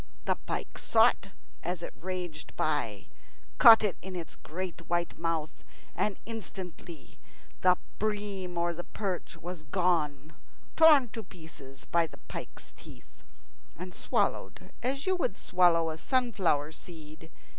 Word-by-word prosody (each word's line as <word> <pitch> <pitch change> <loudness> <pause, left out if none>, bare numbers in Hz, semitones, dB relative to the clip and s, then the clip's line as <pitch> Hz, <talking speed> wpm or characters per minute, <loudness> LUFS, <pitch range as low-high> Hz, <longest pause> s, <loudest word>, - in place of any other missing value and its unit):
The - - +3
pike - - -4
saw - - +6
it - - -7 0.3
as 175 0 -3
it - - -6
raged 175 -4 -5
by, 115 -10 -1 0.5
caught 225 -1 +10
it 205 -4 0
in 190 0 -7
its 170 -2 -6
great 175 0 -6
white 175 0 0
mouth, 165 -2 -2 0.3
and 210 -2 0
instantly 185 -7 -8 0.4
the 180 -1 +5 0.2
bream 205 -4 -2
or 170 0 +1
the 175 +1 -6
perch 185 -5 -4
was 175 0 -6
gone, 155 -2 0 0.4
torn 300 -6 +7
to 225 - -5
pieces 160 -8 -13
by 170 -1 +2
the - - -14
pike's - - -9
teeth, - - -15 0.6
and 180 +1 -7
swallowed - - -1
as 270 +3 -1
you 375 0 +2
would 205 - -1
swallow 170 -3 +3
a 155 - -6
sunflower 190 - +1
seed. 160 -1 -10
175 Hz, 135 wpm, -30 LUFS, 160-195 Hz, 0.6 s, caught